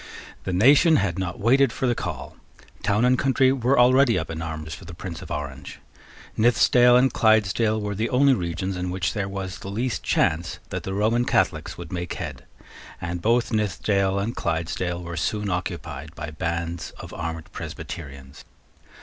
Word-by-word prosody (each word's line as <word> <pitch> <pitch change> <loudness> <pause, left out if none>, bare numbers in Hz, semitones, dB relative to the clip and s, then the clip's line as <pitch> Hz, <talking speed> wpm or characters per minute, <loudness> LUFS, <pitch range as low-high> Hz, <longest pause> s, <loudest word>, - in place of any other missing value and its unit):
The - - -2
nation 140 - +5
had 95 - 0
not 90 -2 -3
waited 130 +4 +4
for 130 - -2
the 120 - +3
call. - - -5 0.5
Town 105 +3 +2
and 125 0 +3
country 130 -1 +3
were 130 +1 +1
already 125 0 +5
up 80 - -3
in 80 0 -5
arms 80 -1 -5
for - - -9
the 90 - -10
Prince 85 -2 -7
of - - -10
Orange. 70 -1 -6 0.6
Nithisdale 120 +2 +5
and 130 +1 +3
Clydesdale 110 0 +3
were 105 -1 -3
the 110 +4 -1
only 135 +2 +4
regions 95 -1 -2
in 90 0 -3
which 90 -2 -1
there 100 -1 -2
was 95 -1 -5
the 95 - -7
least 115 +4 -2
chance 80 +2 0
that - - -3
the 95 - -4
Roman 110 +4 +2
Catholics - - 0
would - - -8
make 90 -1 -3
head; - - -6 0.5
and 85 +1 -4
both 115 +2 +2
Nithisdale 100 -2 +1
and 105 +4 -2
Clydesdale 85 +2 -2
were 85 0 -6
soon 105 0 -1
occupied 85 -4 -5
by 75 -2 -6
bands 85 +2 -3
of - - -9
armed 80 -1 -5
Presbyterians. 70 -4 -8
95 Hz, 175 wpm, -24 LUFS, 85-115 Hz, 0.6 s, nation